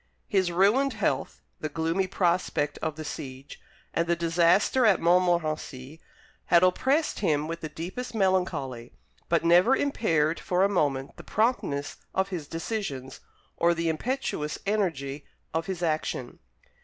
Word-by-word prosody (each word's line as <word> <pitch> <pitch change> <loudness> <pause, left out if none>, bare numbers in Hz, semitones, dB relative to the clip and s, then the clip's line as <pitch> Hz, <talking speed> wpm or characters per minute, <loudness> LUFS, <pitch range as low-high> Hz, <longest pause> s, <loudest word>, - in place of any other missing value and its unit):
His 190 -4 +1
ruined 215 +10 +3
health, 195 -11 -2 0.2
the 155 - -3
gloomy 165 +5 0
prospect 170 -5 0
of 160 -2 -3
the 155 0 -7
siege, 135 -1 -8 0.3
and 170 - 0
the 170 - +2
disaster 170 +8 +3
at 210 -6 +5
Montmorenci, 160 -5 0 0.5
had 170 0 +5
oppressed 270 - +2
him 155 -6 +1
with 165 +1 -5
the 155 - -5
deepest 185 +11 -6
melancholy, 170 - 0 0.4
but 170 0 +2
never 180 +10 +6
impaired 170 - +1
for 180 +1 +1
a - - +5
moment 140 -8 -1
the - - -10
promptness 215 - -1 0.2
of 190 +1 +1
his 170 -6 -5
decisions, 165 - -4 0.4
or 170 0 +3
the 165 0 0
impetuous 160 - -2
energy 160 -9 -1 0.3
of 160 0 -1
his 185 -2 -4
action. 155 -6 -2
170 Hz, 140 wpm, -27 LUFS, 150-195 Hz, 0.5 s, never